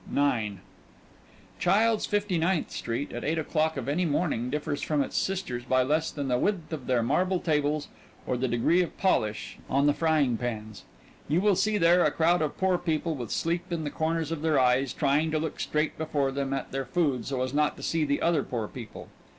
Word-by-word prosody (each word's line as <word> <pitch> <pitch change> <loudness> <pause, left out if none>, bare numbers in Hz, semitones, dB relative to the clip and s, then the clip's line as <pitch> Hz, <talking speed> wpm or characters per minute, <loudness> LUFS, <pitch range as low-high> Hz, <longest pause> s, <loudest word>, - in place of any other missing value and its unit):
IX 115 -8 +1 1.0
"Childs', 220 +2 +3
Fifty 205 -4 0
ninth 170 0 0
Street," 120 +5 -3
at - - -5
eight 160 +3 0
o'clock 160 0 0
of 135 - -4
any 155 +6 +1
morning 145 -6 0
differs 145 0 -2
from 150 -2 +1
its - - -7
sisters 180 -11 -2
by 130 0 +2
less 155 +4 +1
than 145 -2 -4
the 125 -1 +1
width 175 -3 -1
of 140 -5 -6
their 125 -3 +2
marble 180 +9 +1
tables 150 -2 0 0.4
or - - -1
the 130 +1 0
degree 120 +9 +2
of 175 - -4
polish 110 - 0
on 140 +2 +2
the 145 - +4
frying 150 -7 +2
pans. 110 -3 -5 0.4
You 155 +4 +2
will 200 0 +3
see 210 +3 +1
there 175 -1 +5
a - - +4
crowd 170 +2 +2
of 155 - -2
poor 190 -2 +2
people 165 -1 -1
with 120 -7 -5
sleep 170 +2 -2
in 165 -2 -2
the 145 - -3
corners 160 0 -1
of 165 -3 -3
their 155 -3 +2
eyes, 130 +1 +3
trying 150 +2 +1
to 155 - 0
look 155 0 -3
straight 150 +1 -1
before 145 -4 0
them 135 0 -2
at 135 -1 -3
their 135 0 -2
food 135 -5 0
so 130 -2 -1
as 130 +1 -3
not 150 0 +1
to - - -10
see 165 -1 0
the 145 -1 0
other 165 -3 +3
poor 115 -5 -3
people. 115 -2 -9
150 Hz, 210 wpm, -28 LUFS, 130-165 Hz, 1.0 s, there